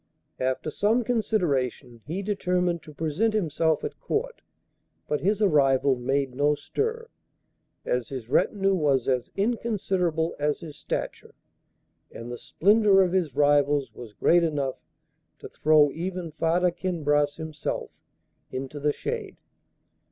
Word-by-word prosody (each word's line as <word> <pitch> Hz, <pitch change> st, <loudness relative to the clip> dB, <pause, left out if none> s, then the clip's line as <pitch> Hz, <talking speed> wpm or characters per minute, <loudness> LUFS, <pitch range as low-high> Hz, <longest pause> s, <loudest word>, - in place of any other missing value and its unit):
After 130 Hz, +4 st, -1 dB
some 225 Hz, +8 st, +2 dB
consideration 145 Hz, -, -1 dB
he 180 Hz, +6 st, -3 dB
determined 180 Hz, -4 st, 0 dB
to 155 Hz, -, -12 dB
present 165 Hz, +9 st, 0 dB
himself 160 Hz, -5 st, +1 dB
at -, -, -5 dB
Court; -, -, -3 dB, 0.7 s
but 150 Hz, -, -1 dB
his 210 Hz, +3 st, +1 dB
arrival 140 Hz, -6 st, +3 dB
made 135 Hz, +1 st, -1 dB
no 145 Hz, +3 st, +2 dB
stir, 450 Hz, -, -3 dB, 0.8 s
as 125 Hz, -2 st, -1 dB
his 130 Hz, -5 st, -6 dB
retinue 195 Hz, -, +2 dB
was 145 Hz, -8 st, +1 dB
as 125 Hz, -2 st, 0 dB
inconsiderable 195 Hz, -7 st, 0 dB
as 150 Hz, +3 st, 0 dB
his 155 Hz, -4 st, -9 dB
stature, -, -, -5 dB, 0.8 s
and 115 Hz, +1 st, -8 dB
the 120 Hz, -, -6 dB
splendour 200 Hz, 0 st, +4 dB
of 180 Hz, -1 st, -1 dB
his 170 Hz, -8 st, 0 dB
rivals 145 Hz, -1 st, +3 dB
was 115 Hz, -4 st, -10 dB
great 170 Hz, +10 st, +3 dB
enough 145 Hz, -5 st, -1 dB, 0.6 s
to -, -, -9 dB
throw 150 Hz, -2 st, +4 dB
even 175 Hz, +1 st, -4 dB
Farda 170 Hz, +3 st, +1 dB
Kinbras 150 Hz, -5 st, 0 dB
himself 160 Hz, -2 st, -5 dB, 0.6 s
into 135 Hz, +3 st, -5 dB
the 150 Hz, +1 st, +1 dB
shade. 445 Hz, -4 st, -5 dB
160 Hz, 130 wpm, -26 LUFS, 140-195 Hz, 0.8 s, splendour